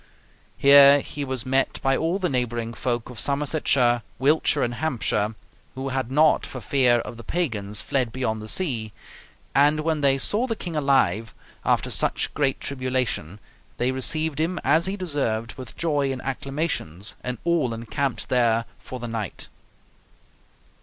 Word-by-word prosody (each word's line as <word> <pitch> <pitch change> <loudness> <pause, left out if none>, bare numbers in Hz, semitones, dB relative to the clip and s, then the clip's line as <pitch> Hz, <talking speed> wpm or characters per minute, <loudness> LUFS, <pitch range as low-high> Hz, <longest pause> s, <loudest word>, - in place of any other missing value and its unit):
Here 140 0 +8
he 145 - -6
was 130 -4 -4
met 135 +1 +1
by 135 0 +3
all 165 +6 0
the 185 -2 0
neighboring 120 -4 -2
folk 120 0 -3
of 120 - -9
Somersetshire, 140 -4 +1 0.2
Wiltshire, 145 +2 +2
and 120 - -1
Hampshire, 115 -6 -1 0.4
who 135 +1 -4
had 130 -2 -2
not 155 +3 +4
for 130 - -7
fear 125 +1 +3
of 120 - -8
the 115 - -10
Pagans 105 - -1
fled 130 -4 -1
beyond 110 -3 -2
the 110 - -8
sea; 115 - -1 0.6
and 145 +2 +4
when 160 -1 -1
they 135 -1 +4
saw 215 - +1
the 225 - -1
king 175 -6 -6
alive 115 -8 +1 0.3
after - - +1
such - - 0
great 140 -3 0
tribulation, 130 - -2 0.4
they 125 +2 +1
received 155 +3 0
him, 170 +3 0
as 155 +6 +3
he 195 +1 -3
deserved, 135 - -2
with 130 -3 -10
joy 145 -4 0
and 130 -1 -5
acclamations 135 - -2
and 125 -1 -3
all 170 -8 +1
encamped 120 +4 -3
there 115 -2 +2
for 130 - -8
the 120 - -5
night." 115 -5 -5
130 Hz, 155 wpm, -24 LUFS, 115-150 Hz, 0.6 s, Here